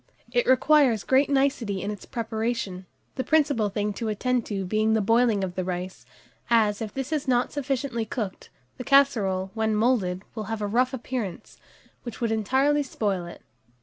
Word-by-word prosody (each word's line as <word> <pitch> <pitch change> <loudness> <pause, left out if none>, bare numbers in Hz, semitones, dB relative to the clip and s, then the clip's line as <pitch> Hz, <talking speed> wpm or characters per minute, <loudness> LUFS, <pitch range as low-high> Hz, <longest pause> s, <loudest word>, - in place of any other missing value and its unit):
It 245 -1 +1
requires 260 -4 +4
great 265 +2 +3
nicety 270 -8 +1
in 205 - -2
its 205 - -9
preparation, 220 -5 -3 0.3
the 260 - 0
principal 285 -9 +2
thing 205 +1 -2
to 225 +2 -4
attend 245 +3 -1
to 195 -3 -3
being 215 +3 +1
the - - +3
boiling 225 -1 +2
of 185 -2 -3
the 185 - -2
rice, 180 +1 -5 0.4
as, 215 -3 +3
if 215 -2 -4
this 270 +2 -5
is 295 -3 -2
not 245 -1 +2
sufficiently 270 -4 -2
cooked, 215 -3 -5 0.3
the - - -4
casserole, 205 -9 +3
when 220 -1 0
moulded, 210 -5 +1
will 220 -2 -5
have 215 +1 -4
a - - +1
rough 245 +5 +1
appearance, 235 -7 -5 0.4
which 240 - -8
would 230 -2 0
entirely 265 +7 +2
spoil 200 -9 -2
it. 170 - -11
225 Hz, 175 wpm, -25 LUFS, 205-260 Hz, 0.4 s, requires